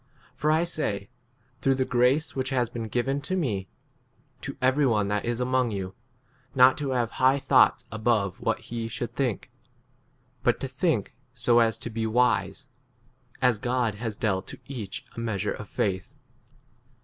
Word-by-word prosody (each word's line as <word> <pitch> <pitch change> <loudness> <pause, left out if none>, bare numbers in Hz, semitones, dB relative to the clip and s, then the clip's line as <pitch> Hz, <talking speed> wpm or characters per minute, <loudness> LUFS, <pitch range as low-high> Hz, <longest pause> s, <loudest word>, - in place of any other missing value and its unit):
For 150 - -1
I 160 +2 +4
say, 115 - -3 0.5
through 135 0 +3
the 130 0 0
grace 125 +6 +2
which 130 -1 -1
has 125 -3 0
been 115 -2 -4
given 135 +5 -1
to 185 +7 -2
me, 105 - -1 0.7
to 140 - -6
every 130 +3 +3
one 105 -4 +2
that 105 0 -1
is 120 0 -1
among 130 -1 +1
you, 95 -3 -4 0.6
not 130 0 +7
to 145 -2 -2
have 120 -3 0
high 130 +2 +5
thoughts 140 - +4
above 105 -4 0
what - - +1
he 115 -1 -4
should 115 +1 -5
think; 125 -2 -2 0.9
but 120 - +2
to 135 - -3
think 130 - 0 0.2
so 120 0 +4
as 115 -1 +3
to 120 - -6
be 110 0 -1
wise, 125 +4 +1 0.8
r 125 - +7
as 115 -4 -1
God 120 -1 0
has 110 +1 -4
dealt 105 -5 -1
to - - -9
each 115 -8 -6
a - - -6
measure 105 -3 -1
of 105 - -9
4 - - -24
faith. 95 +6 -4
120 Hz, 175 wpm, -27 LUFS, 110-130 Hz, 0.9 s, not